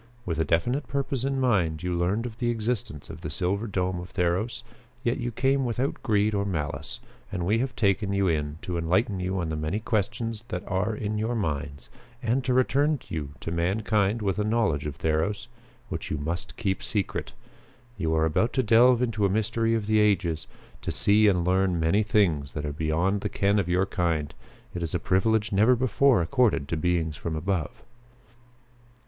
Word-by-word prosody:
With 80 -3 -2
a - - +3
definite 120 - 0
purpose 135 -2 -2
in 135 0 0
mind, 90 - +1
you 90 -1 -1
learned 95 +7 0
of 115 -2 -7
the 120 -1 0
existence 110 - -2
of - - -10
the - - -4
silver 100 +5 -1
dome 95 -3 -1
of 90 +1 -8
Theros, 105 +6 -1 0.4
yet 120 +3 0
you 120 -1 -2
came 135 +4 +1
without 125 +3 -2
greed 105 0 +2
or 100 -1 +1
malice 80 +3 -3 0.3
and 90 -4 -2
we 105 +5 +2
have 130 +1 -2
taken 100 -2 +1
you 100 -1 +2
in 75 -2 -1
to 90 -2 -2
enlighten 95 +4 +1
you 95 +1 -2
on 85 -2 -2
the 80 - -2
many 75 +7 -2
questions 110 +1 -2
that 90 0 -4
are 100 +3 0
in 105 0 -2
your 115 +3 -1
minds 70 - -3 0.3
and 120 +3 +1
to 130 - +1
return 140 +3 +2
you 75 -3 -5
to 80 - -4
mankind 100 +5 +1
with 100 0 0
a - - +2
knowledge 105 -10 +1
of 70 -2 -6
Theros 80 +8 0 0.4
which - - -4
you 75 - -1
must 80 +4 -4
keep 100 -5 -1
secret. 105 -6 -2 0.6
You 80 -6 0
are 80 0 +3
about 80 +9 +1
to 130 - +2
delve 120 +2 +5
into 110 -4 +1
a - - -3
mystery 115 +3 +1
of 110 -2 -1
the 110 +1 +3
ages; 95 -6 +1 0.3
to - - -3
see 105 +1 +4
and 90 -4 +2
learn 95 -1 +2
many 80 +6 +3
things 90 -10 +1
that 75 -1 -4
are 75 - -3
beyond 80 +6 0
the - - -2
ken 100 +1 +2
of 90 -3 -1
your 90 +2 +2
kind. 85 -6 -1 0.4
It 85 - -4
is 85 0 -2
a - - +1
privilege 105 +5 +1
never 110 +6 +5
before 125 -2 +3
accorded 110 - +2
to - - 0
beings 80 -1 0
from 80 -2 -4
above." 85 0 -2
100 Hz, 195 wpm, -26 LUFS, 85-115 Hz, 0.6 s, delve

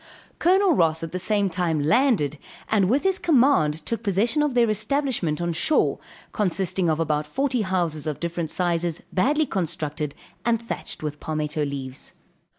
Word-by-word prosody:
Col. 375 +1 +4
Ross 160 - +2
at 165 - -5
the 185 - -3
same 205 +1 +1
time 175 -3 0
landed, 155 - +2 0.3
and 200 -4 +3
with 270 +5 +2
his 385 0 +2
command 245 - +3
took 230 - -2
possession 225 - +1
of 295 -4 0
their 240 -1 +4
establishment 215 - -1
on 170 0 -1
shore, 295 - +2 0.3
consisting 190 -2 +1
of 155 0 0
about 150 -2 0
forty 260 - 0
houses 175 -6 -1
of 150 - -3
different 170 -1 -3
sizes, 170 -1 -1
badly 290 +11 +2
constructed, 155 - -3 0.3
and 235 -1 +2
thatched 230 -7 -6
with 150 -1 -4
palmetto 155 -1 -2
leaves. 135 -2 -6
180 Hz, 155 wpm, -24 LUFS, 155-235 Hz, 0.3 s, Col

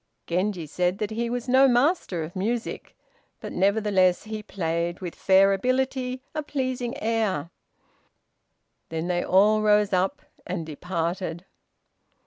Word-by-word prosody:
Genji 180 0 -1
said 180 +4 -1
that 210 0 -3
he 235 +2 -2
was 245 +1 -3
no 260 +2 +6
master 245 - +2
of 160 +4 -8
music; 225 +5 -3 0.4
but, - - -7
nevertheless, 195 -2 +2
he 215 0 -5
played, 170 -3 -2
with 180 -3 -5
fair 195 +1 +4
ability, 255 +3 -1
a 310 - -2
pleasing 255 -4 -3
air. 215 -8 -1 1.4
Then 160 0 -3
they 175 -1 0
all 210 +3 +4
rose 210 -1 +3
up, 185 +1 0 0.2
and 175 -3 -4
departed. 170 +2 -3
200 Hz, 125 wpm, -25 LUFS, 180-235 Hz, 1.4 s, no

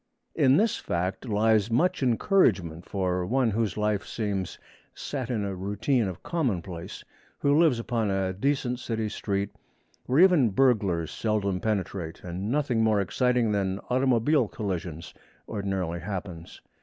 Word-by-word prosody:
In 130 +1 +4
this 220 +2 +2
fact 95 +8 -3
lies 110 0 +3
much 180 +10 +1
encouragement 110 - +2
for 90 -2 -1
one 120 +4 +1
whose 110 -1 -1
life 105 -1 0
seems 100 -5 -3 0.4
set 130 -4 -4
in 110 -5 -1
a 100 - -3
routine 105 +6 0
of 90 -3 -7
commonplace; 95 - -3 0.3
who 140 0 +2
lives 155 -6 +4
upon 115 -2 -1
a 95 -1 0
decent 125 +3 -1
city 110 -3 -2
street, 100 -1 -2 0.6
where 135 +6 +4
even 175 -10 +6
burglars 100 - +2
seldom 100 -4 -1
penetrate, 95 -5 -3
and 90 +4 -4
nothing 130 -4 +1
more 110 -2 +3
exciting 125 +3 +1
than 95 -2 0
automobile 130 +1 +3
collisions 90 -6 -5 0.3
ordinarily 95 -5 -2
happens. 90 -3 -7
105 Hz, 135 wpm, -27 LUFS, 95-125 Hz, 0.6 s, even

